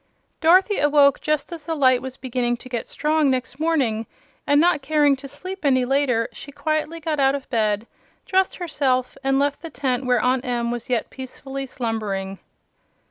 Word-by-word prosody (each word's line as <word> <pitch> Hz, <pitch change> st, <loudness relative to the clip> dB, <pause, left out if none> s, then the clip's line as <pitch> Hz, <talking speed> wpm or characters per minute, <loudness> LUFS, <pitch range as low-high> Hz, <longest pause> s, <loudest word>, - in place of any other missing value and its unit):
Dorothy 370 Hz, +5 st, +4 dB
awoke 285 Hz, -1 st, +4 dB
just 305 Hz, +1 st, -1 dB
as 325 Hz, -3 st, -9 dB
the 325 Hz, -, -2 dB
light 255 Hz, -4 st, +4 dB
was 260 Hz, 0 st, -7 dB
beginning 245 Hz, -2 st, -1 dB
to 255 Hz, -, -12 dB
get 240 Hz, -2 st, -3 dB
strong 305 Hz, -1 st, +1 dB
next 260 Hz, +1 st, -2 dB
morning, 265 Hz, -9 st, 0 dB, 0.4 s
and 285 Hz, 0 st, +5 dB
not 330 Hz, -2 st, +3 dB
caring 290 Hz, 0 st, +3 dB
to 275 Hz, +1 st, -9 dB
sleep 370 Hz, +7 st, -8 dB
any 260 Hz, -3 st, +3 dB
later 255 Hz, -4 st, +1 dB
she 285 Hz, -, -10 dB
quietly 310 Hz, +2 st, -2 dB
got 310 Hz, -2 st, -2 dB
out 270 Hz, 0 st, +4 dB
of 275 Hz, -, -6 dB
bed, 215 Hz, -2 st, +1 dB, 0.4 s
dressed 380 Hz, 0 st, +1 dB
herself, 270 Hz, -7 st, -1 dB
and 270 Hz, 0 st, +2 dB
left 285 Hz, 0 st, 0 dB
the 330 Hz, -, -7 dB
tent 260 Hz, -4 st, -2 dB
where 250 Hz, -1 st, +3 dB
Aunt 250 Hz, +2 st, +1 dB
Em 240 Hz, -2 st, -1 dB
was 240 Hz, 0 st, -5 dB
yet 245 Hz, -2 st, -1 dB
peacefully 270 Hz, +1 st, -7 dB
slumbering. 210 Hz, -6 st, -3 dB
270 Hz, 180 wpm, -22 LUFS, 245-300 Hz, 0.4 s, and